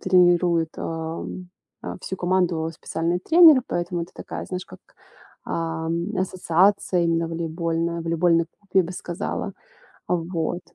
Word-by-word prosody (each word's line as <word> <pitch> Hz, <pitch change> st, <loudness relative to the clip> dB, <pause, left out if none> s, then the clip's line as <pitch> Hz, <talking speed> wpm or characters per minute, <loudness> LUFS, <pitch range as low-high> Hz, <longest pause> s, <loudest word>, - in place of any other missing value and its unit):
тренирует, 175 Hz, -3 st, +3 dB
ам, 165 Hz, +2 st, -5 dB, 0.3 s
э, -, -, -5 dB
всю 190 Hz, -, -5 dB
команду 175 Hz, -3 st, +1 dB
специальный 165 Hz, +3 st, -2 dB
тренер, 320 Hz, -, +7 dB
поэтому 175 Hz, 0 st, -2 dB
это 170 Hz, -, -9 dB
такая, -, -, -6 dB
знаешь, 185 Hz, 0 st, -5 dB
как, -, -, -14 dB, 0.6 s
ам, 165 Hz, +4 st, -2 dB
ассоциация 185 Hz, 0 st, +2 dB
именно 165 Hz, 0 st, +1 dB
волейбольная, 165 Hz, 0 st, -2 dB
волейбольный 165 Hz, 0 st, +2 dB
клуб, 195 Hz, +3 st, -35 dB
я 190 Hz, -, +5 dB
бы 175 Hz, +2 st, -6 dB
сказала. 175 Hz, -1 st, -4 dB, 0.5 s
А, 180 Hz, -, +1 dB
вот 170 Hz, 0 st, -2 dB
170 Hz, 130 wpm, -24 LUFS, 165-185 Hz, 0.6 s, тренер